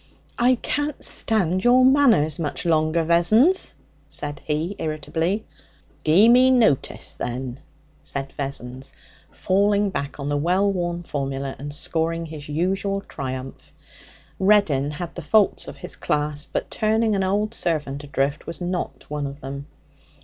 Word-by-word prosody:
'I 250 +2 +5
can't 290 0 -2
stand 185 -4 +1
your 250 +1 +6
manners 240 - +4
much 155 +2 -2
longer, 160 0 +2
Vessons,' 215 - +3 0.3
said 145 0 -4
he 155 +6 -2
irritably. 160 +6 -2 0.6
'Gie 175 +8 +6
me 250 +2 +6
notice, 235 - +2
then,' 125 +1 -5 0.4
said 135 -1 -5
Vessons, 135 -2 -6 0.4
falling 200 +1 +1
back 140 -3 -4
on 140 - -4
the 145 0 0
well 185 +6 +2
worn 175 -2 -2
formula, 135 -3 -3
and 145 +2 -6
scoring 165 +2 -2
his 155 -2 -9
usual 190 +5 -1
triumph. 130 -6 -7 0.7
Reddin 190 -9 +3
had 165 +3 -5
the 175 - -6
faults 200 +7 +2
of - - -8
his - - -6
class, 150 0 -1
but - - -4
turning 220 0 +1
an 195 - +1
old 205 +3 0
servant 150 -8 -2
adrift 140 +1 -2
was 165 - -6
not 180 0 -4
one 145 -1 -3
of 140 +1 -8
them. 140 +1 -7
165 Hz, 140 wpm, -23 LUFS, 145-200 Hz, 0.7 s, your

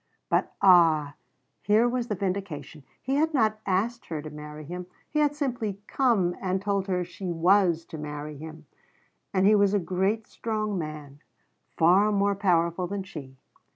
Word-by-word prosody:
But - - +1
ah 165 -6 +5 0.5
here 215 +3 +3
was 245 0 -1
the 210 - -2
vindication! 180 -7 -4 0.2
He 270 +2 0
had 315 +1 +1
not 215 -4 +2
asked 220 +6 -1
her 160 -2 -4
to 155 - -8
marry 150 0 -9
him. 180 +3 -7 0.2
He 300 - -1
had 295 -1 +2
simply 245 -9 -2
come 210 -11 +1
and 190 0 0
told 200 0 -1
her 180 -2 0
she 180 +1 -7
was 170 -1 +3
to 160 - -9
marry 150 0 -6
him. 155 +1 -10 0.7
And 190 -1 +2
he 210 - +6
was 200 -1 +4
a - - +3
great, 190 +5 -1
strong 215 -2 -3
man 155 -4 -6 0.6
far 185 +6 +5
more 200 0 +2
powerful 180 -2 +1
than 200 +1 -4
she. 135 -8 -10
190 Hz, 165 wpm, -27 LUFS, 160-210 Hz, 0.7 s, he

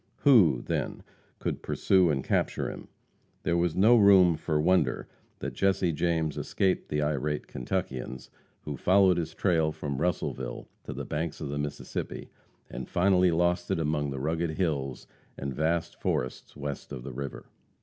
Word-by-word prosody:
Who, 95 - +5
then, - - -3 0.3
could - - -3
pursue 95 -3 +3
and 65 -3 0
capture - - 0
him? - - -10 0.6
There 85 0 +2
is 85 -2 0
no 110 +6 +6
room 95 -6 +6
for 75 -1 -1
wonder 90 +4 +2 0.3
that - - -5
Jesse 95 -2 +2
James 80 -1 0
escaped 95 -2 0
the 75 0 0
irate 75 0 -1
Kentuckians, 65 0 -4 0.3
who 70 -2 -5
followed 95 +3 +4
his 80 -1 -3
trail 80 -5 +2
from 70 -2 -4
Russellville 90 -1 -2 0.2
to - - -5
the - - -5
banks 80 +1 -3
of - - -5
the 70 0 -3
Mississippi, 75 0 -5 0.4
and 65 -1 -7
finally 90 0 +4
lost 85 +1 +1
it 95 - +1
among 75 -2 0
the 70 -1 -4
rugged 80 +2 -1
hills 70 -8 -2 0.3
and 70 0 -4
vast 80 +4 -1
forests 65 - -2
west 70 -1 -5
of 60 - -6
the 70 -1 -7
river. 70 +2 -6
80 Hz, 160 wpm, -28 LUFS, 70-90 Hz, 0.6 s, no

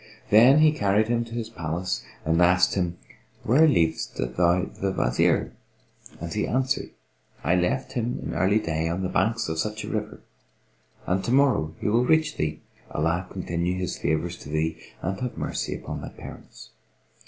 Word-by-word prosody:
Then 125 +8 +7
he 155 -1 +6
carried 105 -4 +1
him 120 0 +1
to 115 0 -9
his 115 -1 -4
palace 85 -1 -3 0.2
and 80 +2 +2
asked 90 +1 +4
him, 90 -2 -1 0.5
"Where 150 +8 +5
leavedst 80 - +1
thou 85 +8 +2
the 100 0 -3
Wazir?"; 60 -9 +1 0.7
and 85 0 -5
he 105 - -1
answered, 130 +2 0 0.5
"I 85 - +2
left 90 +10 0
him 120 0 -2
in - - -4
early 95 +4 +3
day 80 -5 -1
on 90 +3 -2
the 90 - -1
banks 115 +3 +1
of 80 0 -3
such 110 +2 -2
a - - -6
river 105 -1 -4 0.8
and 95 +1 0
To - - -2
morrow 125 - +3
he - - -2
will 115 +4 +3
reach 155 +2 +2
thee, 75 0 -2 0.3
Allah 85 +4 -1
continue 90 -1 -2
his 90 -3 -2
favours 80 +3 -1
to - - -10
thee 80 +1 -1 0.2
and 95 +3 -2
have 125 -2 -4
mercy - - -3
upon - - -6
thy - - -6
parents!" - - -12
95 Hz, 175 wpm, -25 LUFS, 85-115 Hz, 0.8 s, Then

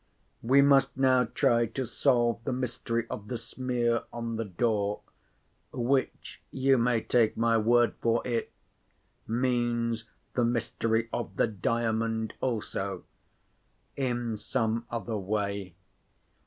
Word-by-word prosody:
We 135 +4 +5
must 135 -1 +4
now 130 -2 +4
try 115 +1 +2
to 130 +4 -3
solve 120 -2 +1
the 135 - -2
mystery 120 -2 -2
of 105 - -6
the 120 - -3
smear 120 0 -1
on 115 -1 -4
the 115 0 -2
door—which, 110 +5 -3
you 135 -1 +2
may 120 -1 +2
take 115 -1 +2
my 115 0 +3
word 120 0 +3
for 115 0 +1
it, 120 -2 -1 0.8
means 120 -1 0 0.3
the 125 - +1
mystery 115 -1 0
of 120 - -3
the - - +3
Diamond 110 +1 -1
also—in 115 +2 -5
some 115 +1 -1
other 115 -1 -3
way. 100 -2 -3
115 Hz, 115 wpm, -29 LUFS, 110-125 Hz, 0.8 s, We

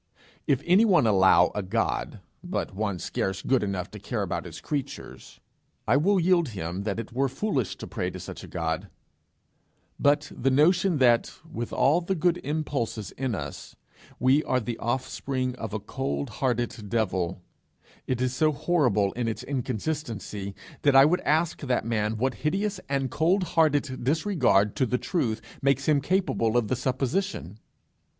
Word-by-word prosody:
If 140 0 +2
any 185 +5 +5
one 180 - +4
allow 95 -4 +5
a 105 - -2
God, 95 +2 -2 0.2
but 175 - -3
one 100 -1 -2
scarce 95 +3 -3
good 130 -1 +2
enough 95 -3 -3
to - - -9
care - - -3
about - - -3
his - - -8
creatures, 140 -2 -6 0.5
I 115 - +4
will 190 +7 +3
yield 170 -3 +3
him 90 +4 -4
that 105 0 -2
it 115 +1 -7
were 135 +2 +1
foolish 135 - -1
to - - -7
pray - - -3
to - - -8
such - - -8
a - - -9
God; 80 -2 -3 1.1
but 145 +1 +2
the 135 - +1
notion 175 +6 +3
that, 120 -3 +4 0.2
with 120 -7 -5
all 155 +6 +3
the 190 +2 -1
good 175 +1 +1
impulses 140 -8 -2
in 130 -4 -2
us, 70 -6 -7 0.4
we 135 +4 +3
are 130 - +1
the 120 -1 -5
offspring 130 +1 -2
of 110 -3 -5
a 110 - -2
cold 135 +4 -3
hearted 120 -5 -1
devil, 95 -5 -1 0.6
is 130 0 0
so 155 +3 +3
horrible 125 - +2
in 120 -1 -3
its 110 - -3
inconsistency, 120 -6 -4 0.3
that 140 -2 +3
I 135 +1 +9
would 175 +4 +2
ask 160 +2 +1
that 130 -6 0
man 110 -1 0
what 130 +3 0
hideous 195 +6 0
and 135 -2 -1
cold 180 +7 +2
hearted 145 -7 +1
disregard 135 - +2
to 130 -4 +2
the 125 - +1
truth 120 -9 -1 0.2
makes 140 0 +1
him 150 -2 +4
capable 140 - +1
of 115 -3 +1
the 130 - +1
supposition! 130 - -2
130 Hz, 165 wpm, -26 LUFS, 110-155 Hz, 1.1 s, I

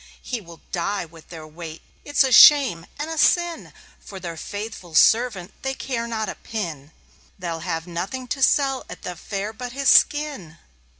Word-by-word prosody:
He 245 -3 -4
will 170 -3 -14
die 190 +1 -2
with 165 -1 -17
their 160 -3 -9
weight: 160 +1 -10 0.2
it's 290 0 +3
a 265 - 0
shame 255 - +7
and 300 +2 -4
a 320 - -3
sin. 345 0 +2 0.3
For 195 - -10
their 170 -2 -6
faithful 205 -2 -7
servant 220 -5 +3
they 265 0 -3
care 235 -4 -3
not 220 -2 -3
a - - -3
pin. 160 -10 -6 0.5
They'll 170 -3 -4
have 165 0 -4
nothing 190 +9 -5
to 270 +4 -3
sell 270 0 +2
at - - -10
the 180 - -5
fair 200 +4 -5
but 245 +2 -7
his 275 0 +1
skin." 285 - +3
210 Hz, 175 wpm, -23 LUFS, 170-265 Hz, 0.5 s, shame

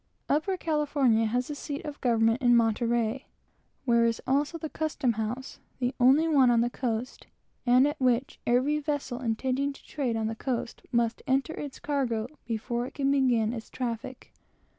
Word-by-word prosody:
Upper 340 +7 +1
California 285 -9 +2
has 245 +3 -1
the 295 - -4
seat 285 0 -5
of - - -2
its - - -26
government 230 0 +2
at 250 - +2
Monterey, 235 +1 +2 0.6
where 235 -2 +4
is 230 -1 +1
also 290 +5 +1
the 320 - -5
custom 295 -5 -1
house, 225 +4 -4 0.2
the 250 0 -1
only 270 +6 +5
one 275 -6 +5
on 235 -1 +4
the 240 +1 0
coast, 240 0 -3 0.4
and 250 +2 +6
at 295 -1 -4
which 255 +1 +1
every 260 +5 +2
vessel 285 -4 -3
intending 260 +4 0
to - - -17
trade 255 -6 -2
on 220 - -1
the 220 - -1
coast 235 0 -4
must 235 -1 +1
enter 270 +4 +1
its 290 -4 -6
cargo 255 -7 -1 0.2
before 235 +2 -2
it - - -13
can 275 -1 +1
commence 240 -5 +2
its 225 - -8
traffic. 245 +1 -5
250 Hz, 175 wpm, -28 LUFS, 235-280 Hz, 0.6 s, and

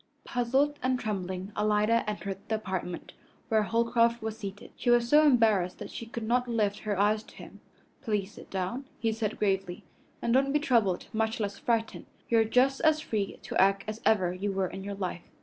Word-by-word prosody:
Puzzled 270 +4 +1
and 255 0 +1
trembling, 190 -3 -4
Alida 210 +2 +2
entered 200 -2 -4
the 220 - 0
apartment 185 -4 -5 0.4
where 220 -1 +3
Holcroft 230 +2 +2
was 220 -1 -4
seated. 200 -2 -8
She 245 - -2
was 240 0 +4
so 300 +4 +6
embarrassed 220 -10 +3
that - - -8
she 230 - -7
could 230 0 -6
not 245 +3 +1
lift 215 -4 0
her 205 -2 -2
eyes 210 +1 +3
to - - -17
him. - - -12 0.4
"Please 205 -2 -1
sit - - -13
down," 190 +8 -3
he 225 -1 0
said 220 -1 -2
gravely, 195 -3 -1 0.4
"and 235 - 0
don't 275 +2 +3
be 295 - +3
troubled, 230 - +2
much 220 +2 0
less 200 -2 -3
frightened. 230 -2 -1 0.2
You 230 - +4
are - - +5
just 255 +4 +2
as 315 -1 +4
free 210 -8 -3
to - - +1
act 195 0 +3
as 215 +1 -5
ever 185 -5 +3
you 195 +2 -2
were 190 -1 0
in 190 - -7
your 200 0 -5
life." 185 -3 -4
220 Hz, 200 wpm, -29 LUFS, 195-235 Hz, 0.4 s, so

